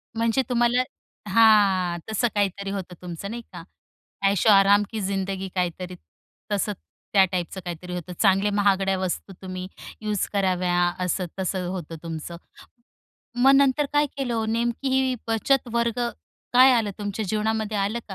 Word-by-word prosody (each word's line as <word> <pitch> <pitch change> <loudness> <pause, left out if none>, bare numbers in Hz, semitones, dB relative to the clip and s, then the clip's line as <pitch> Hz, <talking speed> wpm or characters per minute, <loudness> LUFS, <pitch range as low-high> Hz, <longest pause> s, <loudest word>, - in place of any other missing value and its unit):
म्हणजे 230 +3 +2
तुम्हाला 240 0 +3 0.5
हां 195 -5 +4
तसं 220 +3 +1
काहीतरी 200 -1 -1
होतं 190 -2 -5
तुमचं 180 +2 -6
नाही 235 +1 -5
का, 175 -2 -8 0.6
ऐशो 200 +2 +2
आराम 200 +1 +6
की 220 - -3
जिंदगी 195 0 -2
काहीतरी, 180 0 -2 0.6
तसं 205 +1 0 0.4
त्या 195 -2 +7
टाइपचं 185 +1 -3
काहीतरी 175 +1 -6
होतं. 180 0 -6
चांगले 195 0 +4
महागड्या 195 -1 +2
वस्तू 190 +1 -3
तुम्ही 185 -1 -6 0.3
यूज 210 -2 -1
कराव्या 185 -2 +1 0.3
असं-तसं 180 0 -2
होतं 170 -3 -6
तुमचं. 165 +1 -6 1.0
मग 260 +3 +6
नंतर 280 +1 +3
काय 295 0 +3
केलं 265 -4 -2
ओ 225 -1 0
नेमकी 235 +4 -1
ही 265 -1 +2
बचत 240 +4 +1
वर्ग 235 0 0 0.5
काय 255 +2 +7
आलं 225 -4 +1
तुमच्या 205 +1 -3
जीवनामध्ये 220 +1 -1
आलं 200 +4 0
का? 195 - -6
200 Hz, 140 wpm, -24 LUFS, 185-230 Hz, 1.0 s, त्या